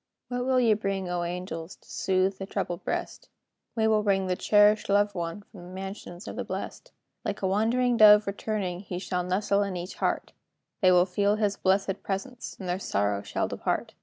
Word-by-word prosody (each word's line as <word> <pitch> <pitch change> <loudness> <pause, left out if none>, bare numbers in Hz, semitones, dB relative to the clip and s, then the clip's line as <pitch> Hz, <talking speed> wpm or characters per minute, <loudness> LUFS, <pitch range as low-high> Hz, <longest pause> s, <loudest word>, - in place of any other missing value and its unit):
What 245 0 -2
will 260 -1 +3
ye 230 -3 +4
bring, 195 -3 -2
O 175 0 -1
angels, 175 -1 -5
To - - -26
soothe 190 0 0
the 195 - -5
troubled 190 -4 -3
breast? - - -4 0.5
"We 220 -1 +2
will 215 -1 +3
bring 195 -2 +1
the 185 -1 0
cherished 210 +2 +4
loved 205 +1 +3
one 170 +2 -4
From 200 -2 -14
the 175 - -11
mansions 190 -1 -7
of - - -6
the - - -3
blest. - - -6 0.3
Like - - -4
a - - +3
wandering 235 +5 +2
dove 210 -1 +8
returning, 200 -3 -3
He 185 -2 -6
shall 180 0 -2
nestle 200 +3 +1
in 200 -3 -2
each 175 +2 -6
heart; - - -1 0.5
They 185 -2 +6
will 180 0 +5
feel 200 +3 +1
his 210 -2 0
blesséd 195 0 +1
presence, 240 +6 -5
And 190 - -6
their 180 +1 -1
sorrow 100 - 0
shall - - -2
depart. - - -2
195 Hz, 195 wpm, -27 LUFS, 180-210 Hz, 0.5 s, dove